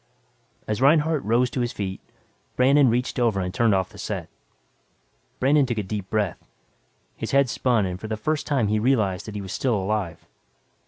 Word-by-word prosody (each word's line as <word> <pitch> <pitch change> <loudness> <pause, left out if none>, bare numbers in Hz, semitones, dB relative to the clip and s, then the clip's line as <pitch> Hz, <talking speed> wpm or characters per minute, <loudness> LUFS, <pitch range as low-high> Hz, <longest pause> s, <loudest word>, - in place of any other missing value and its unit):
As 105 +2 -2
Reinhardt 150 +2 +3
rose 120 +3 +2
to 130 - -2
his 120 0 -1
feet, 95 -5 -5 0.5
Brandon 135 +1 +5
reached 125 +2 -1
over 115 -5 +2
and 90 -1 -3
turned 115 -1 +3
off 95 -1 0
the - - -14
set. - - -4 1.1
Brandon 140 +1 +3
took 120 -2 -2
a 105 - -1
deep 100 0 -5
breath. 105 -5 -1 0.7
His - - -5
head 140 -1 +4
spun 120 -6 +1
and 90 -1 -4
for 110 - -5
the 110 0 -3
first 155 +7 -2
time 135 -8 +1
he 105 +1 +1
realized 110 -7 +1
that 105 - -7
he 105 - -3
was 95 -1 -6
still 125 -4 0
alive. 95 -4 -2
110 Hz, 190 wpm, -24 LUFS, 100-130 Hz, 1.1 s, Brandon